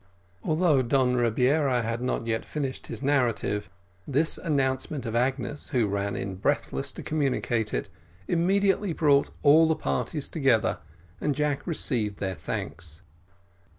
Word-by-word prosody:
Although 155 Hz, -, +2 dB
Don 125 Hz, 0 st, +2 dB
Rebiera 125 Hz, +2 st, +2 dB
had 115 Hz, +1 st, -2 dB
not 125 Hz, -2 st, -1 dB
yet 115 Hz, -1 st, -1 dB
finished 140 Hz, -4 st, -4 dB
his -, -, -7 dB
narrative, 120 Hz, -7 st, 0 dB, 0.4 s
this 150 Hz, +4 st, +1 dB
announcement 135 Hz, -3 st, -1 dB
of 115 Hz, 0 st, -3 dB
Agnes, 130 Hz, +3 st, -1 dB
who 125 Hz, -6 st, +2 dB
ran 100 Hz, 0 st, -2 dB
in 95 Hz, -1 st, -4 dB
breathless 70 Hz, -7 st, -1 dB
to -, -, -8 dB
communicate 130 Hz, -7 st, 0 dB
it, -, -, -2 dB, 0.4 s
immediately 195 Hz, +2 st, +2 dB
brought 145 Hz, -3 st, +3 dB
all 155 Hz, +3 st, +7 dB
the 160 Hz, -, +2 dB
parties 155 Hz, -1 st, -2 dB
together, 135 Hz, -8 st, +1 dB, 0.4 s
and 145 Hz, -2 st, 0 dB
Jack 150 Hz, +1 st, -1 dB
received 115 Hz, -, +1 dB
their 95 Hz, -1 st, -2 dB
thanks. 85 Hz, -1 st, -6 dB
130 Hz, 135 wpm, -27 LUFS, 115-150 Hz, 0.4 s, all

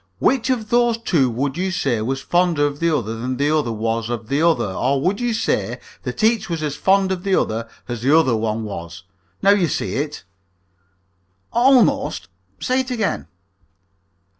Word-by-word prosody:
Which 260 Hz, -, +1 dB
of 230 Hz, -4 st, -1 dB
those 240 Hz, -1 st, +3 dB
two 165 Hz, -, +1 dB
would 135 Hz, +5 st, -2 dB
you 190 Hz, +1 st, 0 dB
say 135 Hz, -11 st, 0 dB
was 135 Hz, +4 st, -2 dB
fonder 175 Hz, -4 st, +2 dB
of 145 Hz, 0 st, -3 dB
the 170 Hz, -, +2 dB
other 115 Hz, -8 st, -1 dB
than 125 Hz, +2 st, -3 dB
the 145 Hz, +3 st, +2 dB
other 145 Hz, -6 st, 0 dB
was 115 Hz, +1 st, -2 dB
of 115 Hz, -2 st, -4 dB
the 140 Hz, +2 st, +1 dB
other, 165 Hz, -1 st, +3 dB
or 135 Hz, +7 st, +1 dB
would 190 Hz, -, 0 dB
you 245 Hz, -1 st, 0 dB
say 225 Hz, -, -1 dB, 0.2 s
that -, -, -5 dB
each 220 Hz, -2 st, +2 dB
was 165 Hz, -2 st, -2 dB
as 150 Hz, -2 st, -2 dB
fond 195 Hz, 0 st, +2 dB
of 185 Hz, -2 st, -2 dB
the 195 Hz, -1 st, +2 dB
other 115 Hz, +1 st, -1 dB, 0.2 s
as 120 Hz, -2 st, -5 dB
the 140 Hz, +6 st, +4 dB
other 130 Hz, -8 st, +3 dB
one 110 Hz, 0 st, -1 dB
was? 85 Hz, -4 st, -7 dB, 0.4 s
Now 200 Hz, -, +6 dB
you 200 Hz, -4 st, +3 dB
see 140 Hz, -, -2 dB
it." 145 Hz, +1 st, -3 dB, 1.3 s
"Almost. 250 Hz, +1 st, +3 dB, 0.3 s
Say 255 Hz, +1 st, 0 dB
it 260 Hz, 0 st, -2 dB
again." 225 Hz, -5 st, -2 dB
150 Hz, 185 wpm, -20 LUFS, 120-200 Hz, 1.3 s, Now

